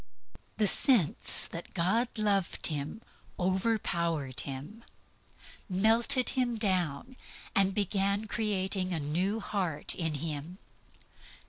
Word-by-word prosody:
The 215 - +3
sense 205 - +4
that 170 0 -8
God 195 +8 +1
loved 200 -4 0
him 150 +8 -2 0.4
overpowered 175 - -1
him, 145 - -5 0.9
melted 230 +7 +3
him 245 -3 -1
down, 185 - -1 0.4
and 195 -1 +3
began 200 0 +1
the 220 - -8
creating 195 -3 0
of 160 - -3
a - - -5
new 185 +9 -1
heart 180 -8 -1
in 160 -3 -2
him. 155 +3 -5
190 Hz, 110 wpm, -30 LUFS, 165-215 Hz, 0.9 s, sense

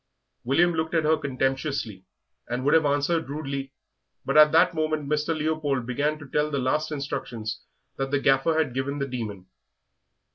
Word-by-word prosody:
William 170 +8 +3
looked 160 +1 -2
at 160 - +3
her 155 +1 +4
contemptuously, 135 -7 -2 0.4
and 125 +2 -2
would 145 - +4
have 160 -2 +4
answered 145 +2 0
rudely, 140 -2 -4 0.5
but - - -1
at 150 0 +8
that 165 +2 +5
moment 155 -2 -1
Mr. 150 +2 0
Leopold 150 -5 -1
began 145 +5 -1
to 145 -1 -11
tell 150 +3 0
the 145 - -2
last 150 +4 0
instructions 125 -6 -4 0.4
that 135 0 -2
the 145 0 +1
Gaffer 135 +4 +2
had 150 -6 +1
given 135 +2 -2
the 140 -1 -2
Demon. 110 -7 -5
145 Hz, 170 wpm, -26 LUFS, 135-155 Hz, 0.5 s, at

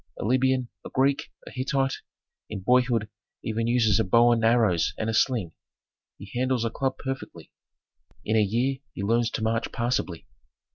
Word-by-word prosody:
A - - -4
Libyan, 130 +1 +2 0.2
a - - -8
Greek, 135 +1 +1
a - - -10
Hittite, 135 +1 -1 0.5
in 105 -3 -5
boyhood 125 0 +2 0.4
even 115 +1 -1
uses 115 -4 +3
a - - +3
bow 115 +5 +5
and 115 -1 +1
arrows 110 -8 +3
and 110 0 -1
a - - -4
sling; 110 -7 +1 0.7
he 100 +1 -11
handles 125 -1 0
a 115 - -1
club 135 +2 -2
perfectly; 135 -1 -6 0.7
in 110 - +1
a 110 - +5
year 120 +6 0
he 100 - -5
learns 115 +3 +2
to 110 - -4
march 110 +1 -1
passably. 120 -8 -2
115 Hz, 170 wpm, -26 LUFS, 110-130 Hz, 0.7 s, bow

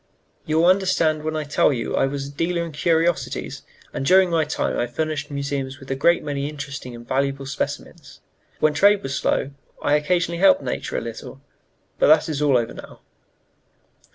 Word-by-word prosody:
"You 155 0 +1
will 165 - +4
understand 180 -4 +2
when 155 +1 -3
I 155 - -1
tell 150 0 +2
you 120 -4 -2
I - - +2
was 140 0 -4
a 140 - -8
dealer 170 +3 -1
in 165 - -7
curiosities, 165 +2 0 0.3
and - - -3
during 185 +4 +5
my 160 -2 +2
time 150 - -2
I 120 - 0
furnished 155 +3 -3
museums 140 -2 -4
with 135 0 -9
a - - 0
great 170 +6 +3
many 140 0 -3
interesting 140 -4 -7
and 120 0 -12
valuable 135 0 -1
specimens; 135 - -6 0.4
when 155 0 +3
trade 200 +6 +4
was 135 0 -4
slow, 140 - 0 0.3
I 145 - 0
occasionally 170 +3 +1
helped 275 +10 +5
nature - - -3
a - - -2
little, - - -8 0.6
but - - +4
that - - +5
is 150 -2 -2
all 140 -4 +4
over 115 -1 -2
now." - - -12
150 Hz, 185 wpm, -22 LUFS, 140-170 Hz, 0.6 s, during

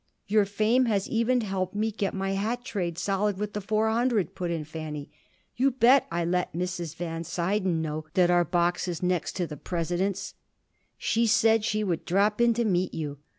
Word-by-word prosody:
"Your 210 0 +3
fame 215 +6 +2
has 205 -4 0
even 235 +2 +1
helped 190 -3 -3
me 220 +2 0
get 200 -2 -2
my 195 0 -1
hat 225 +5 -2
trade 175 -8 -3
solid 200 +1 0
with 210 +1 -4
the 210 - -3
Four 215 +2 +1
Hundred," 230 -4 +1
put 175 -1 -3
in 165 -2 -2
Fanny. 155 -2 -7 0.4
"You 265 +3 +3
bet 260 +1 +4
I 170 0 -1
let 180 +1 0
Mrs. 175 -2 -3
Van 165 -1 -4
Suyden 180 0 0
know 155 0 -4
that 180 -1 +4
our 175 0 +4
box 175 +1 0
is 175 -1 -4
next 180 -2 0
to 180 - -1
the 150 -2 -8
President's. 180 +5 -2 0.6
She 230 +1 +1
said 225 0 +4
she 215 0 0
would 175 -5 -1
drop 205 +5 +2
in 235 -1 +4
to 235 0 +1
meet 185 -3 0
you. 145 -3 -4
190 Hz, 195 wpm, -27 LUFS, 175-215 Hz, 0.6 s, bet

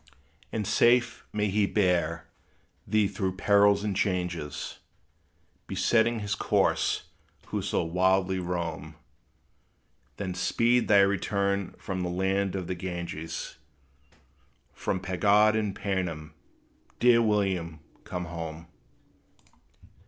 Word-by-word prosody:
And 110 -2 -2
safe 120 +3 +2
may 105 0 0
he 105 0 +2
bear 85 -5 +1 0.6
thee 105 0 +3
through 95 -2 -3
perils 100 +1 +4
and 105 -2 -1
changes 90 -6 -2 0.9
Besetting 115 0 +2
his 105 0 -2
course, - - +1 0.5
who - - -2
so - - -1
widely 95 +2 +1
would 90 -1 -5
roam, 85 -2 -4 1.2
Then 95 -3 -3
speed 120 +6 +2
thy 100 -1 +6
return 100 0 0
from 95 -1 -4
the 90 - -2
land 95 +2 0
of 95 -2 -3
the 90 - -3
Ganges, 85 -3 -5 1.2
From 95 - -2
pagod 100 +3 +3
and 105 -3 -1
painim! 90 -6 -3 0.7
Dear 120 -1 +5
William, 95 -7 0 0.2
come 90 -1 -5
home. 85 -1 -6
95 Hz, 110 wpm, -28 LUFS, 90-105 Hz, 1.2 s, thy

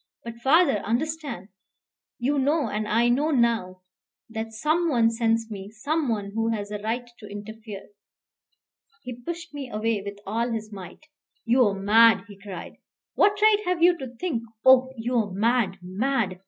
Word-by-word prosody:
But, 235 0 -8
father, 275 - +4
understand! 255 - -3 0.7
You 275 +4 0
know, 285 0 +1
and 210 +1 -2
I 230 +3 +3
know 275 +6 +2
now, 230 -9 0 0.5
that 225 0 -4
some 310 +9 0
one 230 -5 +3
sends 225 -1 0
me, 195 -1 -7
some 285 +6 -2
one 205 -3 -2
who 225 +2 -1
has 205 -2 -3
a 210 - -4
right 230 +4 -3
to 210 - -10
interfere." 210 0 -9 1.2
He 250 - -6
pushed 335 +4 -6
me 280 -3 -6
away 215 -1 -1
with 200 0 -7
all 230 +4 -1
his 220 -1 -5
might. 190 - -10 0.4
"You 240 0 +4
are 200 - -1
mad," 225 +3 +5
he 205 - -12
cried. 195 -2 -9 0.4
"What 410 0 +3
right 425 -1 +5
have 360 -2 0
you 350 0 +6
to 265 - -5
think? 290 -5 -2 0.2
Oh, 260 0 +6
you 240 +2 -2
are 215 -3 +1
mad 210 0 +1
mad! 195 0 -1
230 Hz, 165 wpm, -25 LUFS, 210-270 Hz, 1.2 s, you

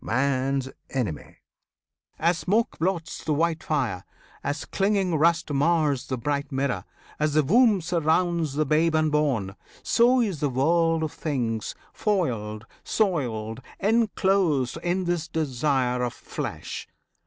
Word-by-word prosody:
man's 135 +1 0 0.2
enemy! 105 - -4 0.8
As 170 +1 +2
smoke 220 +5 0
blots 165 -2 -2
the 155 - 0
white 165 +1 +1
fire, 125 - -1 0.4
as 145 +1 -2
clinging 195 -2 +1
rust 160 0 +2
Mars 145 -2 +2
the 130 - -2
bright 140 +3 -2
mirror, 135 -8 -1 0.3
as 150 0 +1
the 155 - +5
womb 215 - +4
surrounds 165 -2 +1
The 155 +1 +1
babe 160 +3 +2
unborn, 150 -11 +1 0.3
so 245 +2 +4
is 200 -10 0
the 145 - +1
world 165 +5 +2
of 155 - -2
things 120 -8 -2 0.2
Foiled, 115 - -1 0.2
soiled, 125 - -1 0.2
enclosed 195 - +2
in 180 +2 0
this 175 -2 -1
desire 135 -5 0
of 125 -1 -1
flesh. - - -6
155 Hz, 125 wpm, -25 LUFS, 130-175 Hz, 0.8 s, the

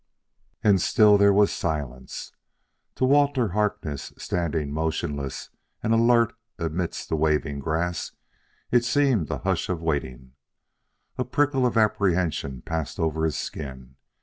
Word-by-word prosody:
And 100 -4 +4
still 105 +2 +5
there 100 0 +6
was 100 +1 +4
silence. 70 -6 -4 0.6
To 130 - +1
Walter 140 -3 +3
Harkness, 90 -7 -2
standing 80 -4 -2
motionless 75 -3 -3 0.3
and 110 - +2
alert 115 0 +4 0.2
amidst 85 +1 -3
the - - +1
waving 75 -2 0
grass, 85 +3 -2 0.6
it 120 -1 +4
seemed 130 - +2
a - - -2
hush - - -1
of 85 -3 -2
waiting. 65 -5 -3 0.9
A - - +2
prickle 135 0 +1
of 120 - -2
apprehension 90 - +1
passed 80 -2 -4
over 80 0 0
his 80 - -1
skin. 65 -3 -7
85 Hz, 125 wpm, -25 LUFS, 75-110 Hz, 0.9 s, there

